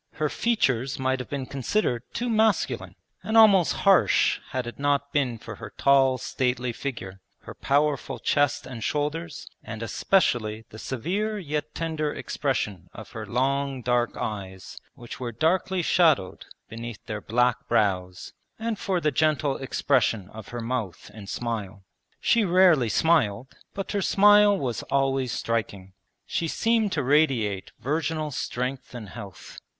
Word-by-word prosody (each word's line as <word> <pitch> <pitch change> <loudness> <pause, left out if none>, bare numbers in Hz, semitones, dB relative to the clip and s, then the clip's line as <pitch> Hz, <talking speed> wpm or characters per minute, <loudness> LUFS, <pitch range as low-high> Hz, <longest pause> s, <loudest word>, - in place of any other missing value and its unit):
Her 150 0 -1
features 135 - 0
might 130 0 0
have 125 - -7
been 140 -2 -3
considered 135 - -1
too 245 - -3
masculine 220 -2 +1 0.3
and 220 +1 0
almost 200 -6 +6
harsh 195 -1 +4
had 130 -1 -3
it 120 - -8
not 140 0 0
been 130 -5 0
for - - -9
her - - -10
tall 135 -2 +4
stately 125 -1 -1
figure, 100 -8 -6 0.2
her - - -10
powerful 145 0 0
chest 145 0 +1
and 120 -3 -7
shoulders, 150 +2 -2 0.2
and 110 0 -6
especially 115 - +1
the 110 - -10
severe 195 - -2
yet 150 -5 -4
tender 160 -2 -2
expression 105 - -3
of 110 - -10
her 110 -3 -7
long 135 +2 -1
dark 120 0 0
eyes 95 -3 -6 0.2
which 120 - -10
were 120 -2 -4
darkly 180 +7 0
shadowed 160 - +2 0.2
beneath 115 0 -8
their 105 -1 -5
black 125 +3 +1
brows, 95 -5 0 0.2
and 225 -1 -3
for 190 -3 0
the 150 -3 +1
gentle 150 0 +1
expression 115 -6 0
of 110 -2 -10
her 120 -1 -6
mouth 115 -6 -4
and 105 -2 -10
smile. 105 -5 -4 0.4
She 230 -2 +3
rarely 175 - +4
smiled, 130 -6 +1 0.2
but 195 - -4
her 200 - 0
smile 205 +1 +5
was 125 - -3
always 135 -2 +1
striking. 100 -6 -3 0.3
She 165 - -2
seemed 225 +3 +1
to 145 - 0
radiate 125 -9 +1
virginal 155 +1 -2
strength 125 0 -4
and 110 -5 -7
health. 95 -1 -10
135 Hz, 145 wpm, -25 LUFS, 115-160 Hz, 0.4 s, almost